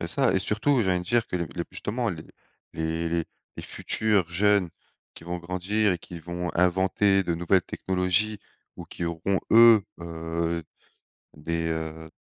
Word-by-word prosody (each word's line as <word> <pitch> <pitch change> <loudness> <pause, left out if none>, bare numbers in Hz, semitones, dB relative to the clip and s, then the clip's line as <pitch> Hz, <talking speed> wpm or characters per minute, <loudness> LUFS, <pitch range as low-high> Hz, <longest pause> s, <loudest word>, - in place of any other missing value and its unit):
C'est 85 - -3
ça 135 +7 +2
et - - +4
surtout, 115 +6 +1
j'ai 95 - +1
envie 90 - +2
de 90 - -7
dire 115 +4 +1
que - - -3
les 85 -1 -2 0.2
justement 115 +3 -2
les 80 -4 -7 0.5
les 80 +1 -2 0.5
les - - -6
futurs 105 -6 0
jeunes 100 0 +2 0.4
qui - - -12
vont 90 +1 -4
grandir 90 +4 0
et 85 - -3
qui 85 +1 -10
vont 85 +1 -4
inventer 95 +2 +3
de 85 -2 -1
nouvelles 85 +2 +2
technologies 95 +3 0 0.4
ou - - -8
qui 85 - -6
auront 85 +3 -1
eux, 115 -2 +8 0.2
heu, 85 0 -3 0.7
des, 80 +2 -2
heu, 80 0 -4
90 Hz, 160 wpm, -26 LUFS, 85-100 Hz, 0.7 s, eux